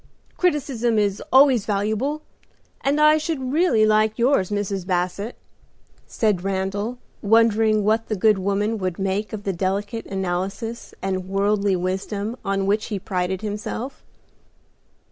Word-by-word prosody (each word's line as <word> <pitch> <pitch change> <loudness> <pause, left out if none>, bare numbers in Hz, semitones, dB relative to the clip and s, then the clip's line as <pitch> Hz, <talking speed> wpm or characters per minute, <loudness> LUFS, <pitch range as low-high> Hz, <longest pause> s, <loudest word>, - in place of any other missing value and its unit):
Criticism 270 -9 0
is 205 -2 +1
always 260 -5 +5
valuable, 220 +9 -1 0.6
and 280 +2 +1
I 305 +1 +6
should 290 -5 -3
really 295 -10 +4
like 215 0 +2
yours, 240 -6 +2
Mrs. 205 -2 -2
Basset," 185 +5 -1 0.7
said 210 -5 0
Randal, 195 +4 -2 0.2
wondering 220 0 +3
what 220 +2 +1
the 215 - -1
good 210 +1 +3
woman 205 +3 0
would 185 -2 -2
make 195 +2 -2
of 215 -2 -6
the 195 - -1
delicate 200 +5 -2
analysis 195 +5 -4
and 190 -1 -2
worldly 200 0 +1
wisdom 195 +4 -3
on 195 0 0
which 205 +2 +1
he 210 - -3
prided 185 -1 -2
himself. 220 +5 -5
210 Hz, 130 wpm, -23 LUFS, 195-230 Hz, 0.7 s, I